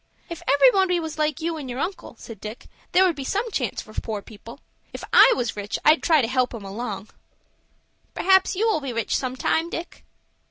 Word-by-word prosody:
"If 335 Hz, -2 st, -7 dB
everybody 365 Hz, -, +4 dB
was 320 Hz, -1 st, -6 dB
like 305 Hz, 0 st, 0 dB
you 330 Hz, 0 st, -2 dB
and 280 Hz, -4 st, -7 dB
your 245 Hz, -, -5 dB
uncle," 365 Hz, +7 st, -5 dB
said 225 Hz, -4 st, -11 dB
Dick, 215 Hz, +2 st, -8 dB, 0.3 s
"there 375 Hz, +1 st, +5 dB
would 350 Hz, -3 st, +1 dB
be 280 Hz, -, -6 dB
some 415 Hz, -, -2 dB
chance 250 Hz, -, -2 dB
for 215 Hz, -, -15 dB
poor 215 Hz, -2 st, -4 dB
people. 230 Hz, +4 st, -13 dB, 0.3 s
If -, -, -7 dB
I -, -, +8 dB
was 240 Hz, -4 st, -2 dB
rich 205 Hz, 0 st, -4 dB
I'd 310 Hz, +2 st, +5 dB
try 315 Hz, -5 st, +3 dB
to -, -, 0 dB
help 255 Hz, 0 st, 0 dB
'em 210 Hz, -3 st, -8 dB
along." 210 Hz, 0 st, -6 dB, 1.1 s
"Perhaps 380 Hz, 0 st, +3 dB
you 435 Hz, +5 st, +1 dB
will 375 Hz, -9 st, +1 dB
be 270 Hz, -3 st, -4 dB
rich 230 Hz, -2 st, -1 dB
sometime, 260 Hz, +6 st, -1 dB
Dick." 340 Hz, 0 st, -7 dB
280 Hz, 200 wpm, -23 LUFS, 230-340 Hz, 1.1 s, I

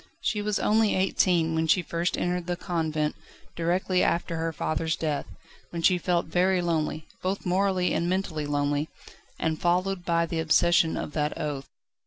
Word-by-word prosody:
She 210 Hz, -, -1 dB
was 210 Hz, -1 st, 0 dB
only 215 Hz, 0 st, +2 dB
eighteen 180 Hz, -3 st, +2 dB
when 160 Hz, 0 st, 0 dB
she 180 Hz, +3 st, +3 dB
first 170 Hz, +2 st, -1 dB
entered 180 Hz, 0 st, -1 dB
the 175 Hz, -, 0 dB
convent, 160 Hz, -4 st, -1 dB, 0.4 s
directly 180 Hz, +2 st, +1 dB
after 170 Hz, 0 st, 0 dB
her 165 Hz, 0 st, -1 dB
father's 160 Hz, 0 st, -1 dB
death, 150 Hz, -3 st, -2 dB, 0.4 s
when 170 Hz, -1 st, -5 dB
she 180 Hz, 0 st, +4 dB
felt 175 Hz, 0 st, +1 dB
very 185 Hz, +1 st, +2 dB
lonely 160 Hz, -2 st, -1 dB, 0.2 s
both 190 Hz, +2 st, -2 dB
morally 185 Hz, 0 st, +1 dB
and 170 Hz, -, 0 dB
mentally 175 Hz, -5 st, -1 dB
lonely 145 Hz, +1 st, 0 dB, 0.5 s
and 160 Hz, -1 st, -1 dB
followed 180 Hz, +1 st, +1 dB
by 170 Hz, -1 st, +1 dB
the 165 Hz, 0 st, -3 dB
obsession 165 Hz, +1 st, +3 dB
of 150 Hz, -, -5 dB
that 150 Hz, -1 st, -1 dB
oath. 145 Hz, -3 st, -4 dB
170 Hz, 165 wpm, -27 LUFS, 160-180 Hz, 0.5 s, she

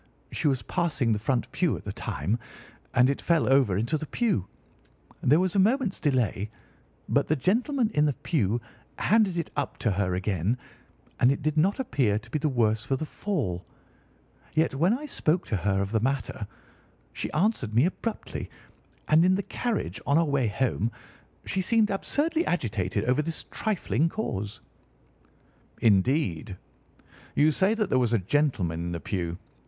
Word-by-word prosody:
She -, -, -1 dB
was 130 Hz, -6 st, +1 dB
passing 150 Hz, -, 0 dB
the 105 Hz, -, -1 dB
front 120 Hz, +2 st, -1 dB
pew 165 Hz, -, +1 dB
at -, -, -11 dB
the -, -, -4 dB
time, 95 Hz, -, -2 dB, 0.6 s
and 125 Hz, +1 st, +6 dB
it 140 Hz, -, -1 dB
fell 170 Hz, -2 st, +2 dB
over 130 Hz, -8 st, +4 dB
into 120 Hz, +9 st, 0 dB
the 155 Hz, -, -6 dB
pew. 170 Hz, -, 0 dB, 0.7 s
There 150 Hz, +6 st, +4 dB
was 185 Hz, 0 st, 0 dB
a -, -, +4 dB
moment's 225 Hz, +1 st, +2 dB
delay, 125 Hz, -, 0 dB, 0.6 s
but -, -, +2 dB
the 155 Hz, -, +2 dB
gentleman 230 Hz, -, +1 dB
in 150 Hz, 0 st, +3 dB
the 145 Hz, -3 st, +1 dB
pew 120 Hz, -, +1 dB, 0.4 s
handed 210 Hz, -4 st, +3 dB
it 170 Hz, -, -3 dB
up 145 Hz, -, -2 dB
to 115 Hz, -, 0 dB
her 95 Hz, -2 st, 0 dB
again, 95 Hz, +4 st, 0 dB, 0.6 s
and 125 Hz, -, +5 dB
it 140 Hz, -, -2 dB
did 155 Hz, 0 st, 0 dB
not 185 Hz, +9 st, +2 dB
appear 130 Hz, -, +1 dB
to 115 Hz, +2 st, -9 dB
be 155 Hz, -, 0 dB
the 150 Hz, -, +1 dB
worse 110 Hz, -4 st, +1 dB
for 135 Hz, +2 st, 0 dB
the 155 Hz, -, -3 dB
fall. 145 Hz, -, -2 dB, 0.9 s
Yet 160 Hz, -1 st, +2 dB
when 175 Hz, -, +2 dB
I 300 Hz, -, -7 dB
spoke 180 Hz, -, 0 dB
to -, -, +1 dB
her 95 Hz, +1 st, +1 dB
of 100 Hz, -, -5 dB
the 110 Hz, -, +2 dB
matter, 120 Hz, -4 st, -2 dB, 0.7 s
she -, -, -4 dB
answered 155 Hz, -, 0 dB
me 125 Hz, +6 st, +5 dB
abruptly; 215 Hz, +5 st, -4 dB, 0.6 s
and 155 Hz, +2 st, +5 dB
in 185 Hz, +1 st, +4 dB
the 200 Hz, -, -1 dB
carriage, 120 Hz, -, -3 dB
on 140 Hz, +2 st, +4 dB
our 165 Hz, -, +4 dB
way 140 Hz, -5 st, +1 dB
home, 115 Hz, 0 st, 0 dB, 0.5 s
she 190 Hz, -, -1 dB
seemed 220 Hz, +2 st, +3 dB
absurdly 315 Hz, +11 st, 0 dB
agitated 105 Hz, -, -1 dB
over 125 Hz, +4 st, +2 dB
this 160 Hz, +1 st, -5 dB
trifling 170 Hz, -, 0 dB
cause." 105 Hz, -, -4 dB, 1.2 s
"Indeed! 105 Hz, -, +2 dB, 0.8 s
You 155 Hz, +2 st, +5 dB
say 190 Hz, +8 st, +2 dB
that 215 Hz, -3 st, -1 dB
there 130 Hz, -, +4 dB
was 120 Hz, -2 st, +1 dB
a -, -, +5 dB
gentleman 100 Hz, -, 0 dB
in 85 Hz, +1 st, -3 dB
the 85 Hz, -, -3 dB
pew. 85 Hz, +1 st, -3 dB
140 Hz, 170 wpm, -27 LUFS, 105-180 Hz, 1.2 s, and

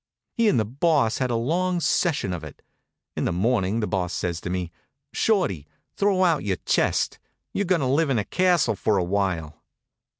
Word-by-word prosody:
He 230 Hz, -2 st, +2 dB
and 160 Hz, -, +2 dB
the 110 Hz, -, +1 dB
Boss 135 Hz, -1 st, +1 dB
had 130 Hz, -1 st, 0 dB
a 120 Hz, -, 0 dB
long 175 Hz, +9 st, 0 dB
session 155 Hz, -, 0 dB
of 85 Hz, -3 st, -5 dB
it. 75 Hz, -, -11 dB, 0.5 s
In -, -, -1 dB
the -, -, 0 dB
morning 105 Hz, +2 st, +1 dB
the 105 Hz, -, -1 dB
Boss 90 Hz, -3 st, -2 dB
says 85 Hz, -2 st, -3 dB
to -, -, -5 dB
me: 90 Hz, -2 st, -3 dB, 0.4 s
"Shorty, 100 Hz, -, 0 dB, 0.3 s
throw 195 Hz, -2 st, +2 dB
out 165 Hz, -5 st, +2 dB
your 95 Hz, -3 st, -1 dB
chest; -, -, +1 dB, 0.3 s
you're 200 Hz, -, 0 dB
going 180 Hz, -3 st, +1 dB
to -, -, 0 dB
live 145 Hz, +4 st, +2 dB
in 130 Hz, -, +1 dB
a 105 Hz, -, -1 dB
castle 180 Hz, -, +2 dB
for 105 Hz, +1 st, +1 dB
a 95 Hz, -, +1 dB
while." 90 Hz, -5 st, -2 dB
115 Hz, 195 wpm, -24 LUFS, -, 0.5 s, He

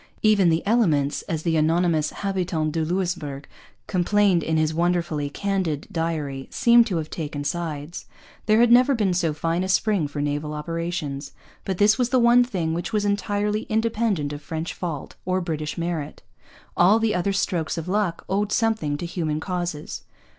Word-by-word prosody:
Even 210 Hz, -5 st, +5 dB
the 165 Hz, 0 st, 0 dB
elements, 165 Hz, -11 st, +2 dB
as 160 Hz, -2 st, -2 dB
the 165 Hz, -2 st, +1 dB
anonymous 160 Hz, 0 st, +2 dB
Habitant 180 Hz, -5 st, -2 dB
de 160 Hz, +1 st, -1 dB
Louisbourg 165 Hz, -5 st, -2 dB, 0.4 s
complains 190 Hz, -1 st, +2 dB
in 160 Hz, 0 st, 0 dB
his 155 Hz, 0 st, +1 dB
wonderfully 170 Hz, -3 st, 0 dB
candid 185 Hz, -3 st, -2 dB
diary, 150 Hz, -5 st, -3 dB
seemed 235 Hz, -2 st, +5 dB
to 185 Hz, -6 st, -1 dB
have 155 Hz, -1 st, -4 dB
taken 145 Hz, -3 st, -4 dB
sides. 155 Hz, 0 st, -4 dB, 0.4 s
There 215 Hz, +1 st, +5 dB
had 240 Hz, 0 st, +5 dB
never 255 Hz, +3 st, +6 dB
been 205 Hz, -5 st, +1 dB
so 175 Hz, -3 st, +1 dB
fine 165 Hz, +4 st, -1 dB
a 190 Hz, -, -3 dB
spring 190 Hz, -3 st, +2 dB
for 145 Hz, +1 st, -6 dB
naval 145 Hz, +1 st, -2 dB
operations. 160 Hz, -3 st, -4 dB, 0.3 s
But 190 Hz, -2 st, -2 dB
this 210 Hz, +5 st, +4 dB
was 250 Hz, -1 st, +2 dB
the 260 Hz, -, +3 dB
one 240 Hz, 0 st, +6 dB
thing 180 Hz, -10 st, -2 dB
which 170 Hz, +1 st, -3 dB
was 210 Hz, -2 st, 0 dB
entirely 205 Hz, +1 st, -1 dB
independent 220 Hz, -9 st, 0 dB
of 145 Hz, -, -7 dB
French 160 Hz, +2 st, -4 dB
fault 165 Hz, -6 st, -5 dB
or 185 Hz, +1 st, 0 dB
British 155 Hz, -4 st, -4 dB
merit. 165 Hz, -3 st, -4 dB, 0.5 s
All 190 Hz, +5 st, +5 dB
the 225 Hz, -1 st, +1 dB
other 180 Hz, +2 st, 0 dB
strokes 175 Hz, -5 st, -1 dB
of 165 Hz, +1 st, -4 dB
luck 190 Hz, -3 st, -1 dB
owed 200 Hz, +2 st, 0 dB
something 220 Hz, -12 st, +1 dB
to 175 Hz, -, -5 dB
human 160 Hz, -3 st, -2 dB
causes. 175 Hz, -3 st, -4 dB
175 Hz, 170 wpm, -24 LUFS, 155-205 Hz, 0.5 s, never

